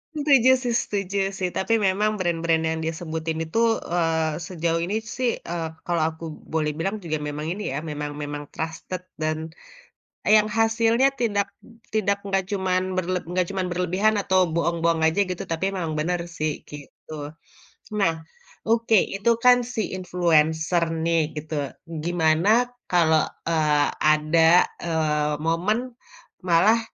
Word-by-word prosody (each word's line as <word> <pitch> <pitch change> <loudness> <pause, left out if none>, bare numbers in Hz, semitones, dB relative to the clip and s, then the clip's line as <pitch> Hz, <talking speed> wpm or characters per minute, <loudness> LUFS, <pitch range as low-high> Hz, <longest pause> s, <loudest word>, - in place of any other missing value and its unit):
Setuju 280 -4 +4
sih 245 - 0
setuju 200 -1 -3 0.2
sih, 185 -1 0
tapi 225 +4 0
memang 205 +3 +1
brand-brand 165 -2 +1
yang 160 0 -1
dia 160 +1 -1
sebutin 160 -1 -4
itu, 160 - -5 0.3
eee, 160 -2 0
sejauh 165 -2 -1
ini 195 +4 -2 0.2
sih, 250 -2 +1
eee, 170 -1 -3 0.2
kalau 170 -2 0
aku 160 +1 -9 0.3
boleh 155 -1 +1
bilang 195 +5 -1
juga 155 -2 -2
memang 150 +1 -4
ini 210 +2 -6
ya, 140 - -2
memang 150 0 -4
memang 145 0 -5
trusted, 165 +3 -5 0.2
dan, 155 +1 -2 0.8
yang 215 0 +6
hasilnya 225 +3 +3
tidak 205 -5 0 0.4
tidak 200 -2 0
nggak 195 -1 -1
cuman 185 -1 -1
berleb 185 0 -2
nggak 180 +2 0
cuman 190 -2 -2
berlebihan 180 +4 +1
atau 190 -1 +2
bohong-bohong 170 0 +1
aja, 160 +5 0
gitu, 180 - -3
tapi 165 +4 -1
memang 165 -4 -2
benar 175 +3 0
sih, 155 -3 -3
gitu. 150 +1 -9 0.7
Nah, 165 -5 +3 0.5
oke, 225 0 +3 0.2
itu 200 +4 +2
kan, 250 0 +7 0.2
si 225 - -1 0.2
influencer 170 -2 +2 0.2
nih, 165 -1 +3 0.2
gitu, 155 +1 -5 0.5
gimana 165 +2 +2 0.4
kalau, 160 -3 +4 0.2
eee, 150 -3 +2 0.2
ada, 160 +3 +5 0.2
eee, 155 -3 0
momen 170 +7 +1 0.7
malah, 185 +7 +5
170 Hz, 140 wpm, -24 LUFS, 160-195 Hz, 0.8 s, kan